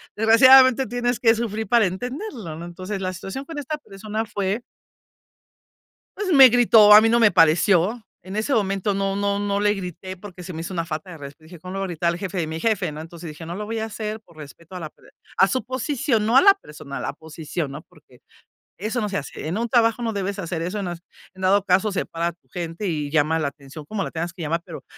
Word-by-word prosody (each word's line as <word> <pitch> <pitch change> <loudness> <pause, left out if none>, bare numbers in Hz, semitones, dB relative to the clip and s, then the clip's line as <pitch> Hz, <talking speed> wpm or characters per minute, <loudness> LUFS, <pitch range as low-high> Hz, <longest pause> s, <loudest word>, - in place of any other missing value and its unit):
desgraciadamente, 260 +4 +6
tienes 245 0 -1
que 225 -2 +5
sufrir 220 -1 -3
para 235 +1 +4
entenderlo, 245 - -6
¿no? 170 - -7
Entonces, 185 +3 -6
la 185 0 -2
situación 195 +9 -7
con 320 +1 -8
esta 290 +2 -4
persona 215 -2 -5
fue 205 +1 -2 1.6
pues, 400 -2 -2
me 270 -3 +9
gritó, 225 -3 +6
a 210 - +10
mí 225 - +3
no 235 +1 +3
me 225 -3 +5
pareció. 180 +7 +3 0.2
En 190 +2 -8
ese 220 +6 -1
momento 200 -2 0
no 195 0 -1
no 200 0 0
no 200 0 -1
le 205 0 +2
grité, 185 -1 -7
porque 185 -1 -11
se 180 - -7
me 160 - -5
hizo 170 - -6
una 165 -1 -1
falta 160 +1 -5
de 170 - -9
resp 145 +1 -10
dije: 165 +3 -13
"Cómo 185 +3 -8
lo 195 - -4
voy 195 - -1
a - - -4
gritar, 170 -1 -1
el 170 - -7
jefe, 190 -1 -5
de 170 - 0
mi 160 +1 -5
jefe", 195 -5 0
¿no? 150 +1 -7
Entonces 165 +1 -10
dije: 155 +1 -9
"No 170 - -5
lo 210 +2 -5
voy 225 +1 -3
a 220 - -2
hacer 215 0 -5
por 170 -7 -23
respeto 155 +4 -12
a - - -5
la 160 -3 -6
per - - -22 0.3
a 190 - +6
su 255 +7 -1
posición, 260 -2 -1
no 235 +3 +4
a - - +8
la 395 0 +8
persona, 150 - -10
a - - -5
la - - -4
posición", 160 0 -6
¿no? 145 +2 -8
Porque 155 -7 -23 0.6
eso 220 +5 -2
no 210 - -2
se 200 - -2
hace. 145 +1 -6
En 170 +5 -2
un 235 +1 -1
trabajo, 230 0 +2
no 225 -1 -1
debes 200 0 -3
hacer 170 -3 -4
eso, 190 +5 -3
no 180 - -3
es 175 - -7 0.3
en 190 - -13
dado 195 +1 +3
caso, 190 +3 +2
separa 170 -3 -2
a - - -1
tu 170 - -39
gente, 170 +2 -5
y 150 -5 -2
llama 155 +2 +2
la 155 - 0
atención, 140 +1 -10
como 200 +4 -3
la - - -5
tengas 170 +1 -4
que 180 - -8
llamar, 165 +2 -1
pero 170 -3 -10
195 Hz, 250 wpm, -23 LUFS, 170-220 Hz, 1.6 s, a